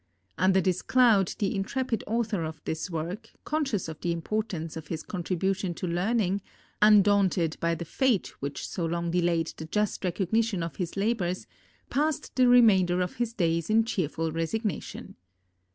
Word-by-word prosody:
Under 190 +1 +3
this 185 -1 0
cloud, 230 -7 +4
the 200 -1 -1
intrepid 230 +4 -2
author 220 -4 0
of 160 -1 -5
this 160 +3 -3
work, 180 +7 -4
conscious 275 - -1
of 160 -1 -8
the 175 - 0
importance 170 -2 -3
of 160 -2 -7
his 160 0 -4
contribution 185 0 -2
to - - -4
learning, 195 +3 0 0.4
undaunted 200 -5 +4
by 170 0 +1
the 170 - -6
fate 240 - +1
which 140 0 -4
so 175 - -4
long 170 +1 -1
delayed 170 -2 +1
the 160 - -6
just 210 +5 -1
recognition 190 +2 0
of 165 - -6
his 180 0 -4
labors, 195 -4 -1 0.5
passed 300 +1 -1
the 255 -1 +5
remainder 195 -8 +5
of 180 -1 -2
his 240 -1 -1
days 165 -4 0
in 225 +1 +4
cheerful 165 -7 -2
resignation. 195 +7 -3
185 Hz, 155 wpm, -28 LUFS, 170-220 Hz, 0.5 s, the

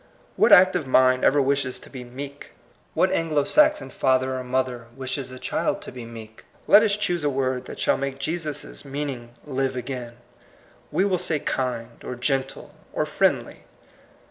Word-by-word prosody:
What - - +4
active 180 -5 +6
mind 130 0 +4
ever 145 - +4
wishes 135 -1 +1
to - - -13
be 130 -2 -7
"meek"? 140 +3 -9 0.4
What - - +3
Anglo 155 -3 +1
Saxon 300 - +3
father 130 0 +1
or - - -5
mother 125 -2 -2
wishes 130 0 -4
a 130 - -9
child - - -1
to - - -8
be 125 -2 -8
"meek"? 110 -1 -11 0.2
Let 210 - +8
us 210 -2 +2
choose 175 -5 -1
a 145 - +2
word 130 -2 -1
that - - -8
shall - - +2
make 135 0 -3
Jesus' 155 +1 -3
meaning 135 -4 -5
live 135 -2 -1
again; 125 -1 -5 0.8
we 175 +6 +2
will 185 -3 +1
say 160 - 0
kind, 120 -4 -3
or 125 - -5
gentle, 135 +1 -2 0.2
or - - 0
friendly. - - 0
135 Hz, 170 wpm, -24 LUFS, 125-150 Hz, 0.8 s, Let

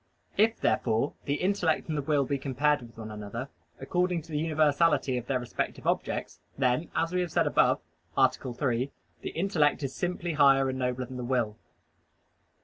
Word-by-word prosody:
If, 225 +2 +3
therefore, 115 +4 +1
the 145 - 0
intellect 180 -3 +1
and 155 - -2
the 145 - 0
will 145 -1 +1
be 140 +1 -1
compared 145 +2 +1
with 115 -1 -13
one 110 -1 -7
another 105 +5 -6 0.3
according 180 -2 0
to 165 - -14
the 150 - 0
universality 155 -3 +2
of 125 -1 -4
their 135 - +1
respective 120 - -4
objects, - - -1 0.2
then, 130 +4 +1
as 165 +2 0
we 180 - +2
have 175 -2 -3
said - - +2
above - - +3 0.4
(A. - - +7
3), 125 +1 -2 0.3
the - - -4
intellect 160 -5 +1
is 135 -1 -3
simply 175 -1 -2
higher 135 -2 +5
and 130 0 -3
nobler 125 0 -1
than 130 +1 -8
the 125 - -4
will. 120 -4 0
140 Hz, 180 wpm, -29 LUFS, 125-160 Hz, 0.4 s, A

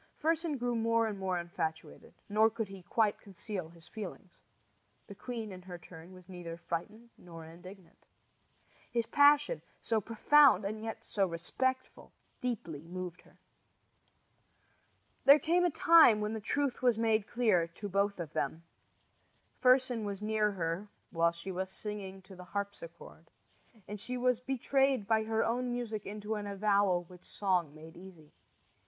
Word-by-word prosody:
Fersen 325 -1 0
grew 245 -1 -1
more 230 0 +2
and 210 -3 -4
more 190 -2 -1
infatuated, 170 -2 -5
nor 215 +2 +4
could 225 -1 -4
he 195 -1 -10
quite 210 +3 +1
conceal 195 -3 -6
his 165 -1 -15
feelings. 195 -4 -9 0.7
The 205 - -10
queen, 225 0 -6
in 185 -1 -9
her 180 -1 -8
turn, 165 +1 -13
was 185 -1 -14
neither 175 -3 -7
frightened 210 +8 -6
nor 165 -2 -11
indignant. 180 +3 -14 0.8
His 235 -1 0
passion, 290 - +4 0.2
so 225 -2 0
profound 230 +1 +5
and 215 +2 -4
yet 225 0 -6
so 195 -2 0
respectful, 260 +10 -3 0.3
deeply 195 - -3
moved 180 0 -6
her. - - -23 1.9
Then 280 +2 +9
came 350 +3 +2
a - - +4
time 325 -9 +6
when 210 +1 -2
the 220 - -4
truth 280 +4 -1
was 245 -3 +3
made 220 -2 +1
clear 215 -9 +2
to 170 +5 -8
both 200 0 0
of 165 -3 -6
them. 160 +4 -2 1.0
Fersen 255 -2 +4
was 200 -2 -4
near 215 0 +1
her 170 +2 -3 0.2
while 170 0 +3
she 170 +3 -7
was 190 +1 -3
singing 195 -1 -7
to 190 0 -13
the 180 - -10
harpsichord, 200 - -7 0.6
and 210 0 -6
"she 250 +5 -4
was 250 -1 +2
betrayed 270 -1 +1
by 220 0 +2
her 220 0 +1
own 245 +2 -1
music 225 -4 -4
into 210 +1 -4
an 210 -1 -4
avowal 200 -3 +2
which 180 +1 -16
song 180 -7 -1
made 160 +1 -12
easy." 175 -4 -14
205 Hz, 155 wpm, -32 LUFS, 180-235 Hz, 1.9 s, Then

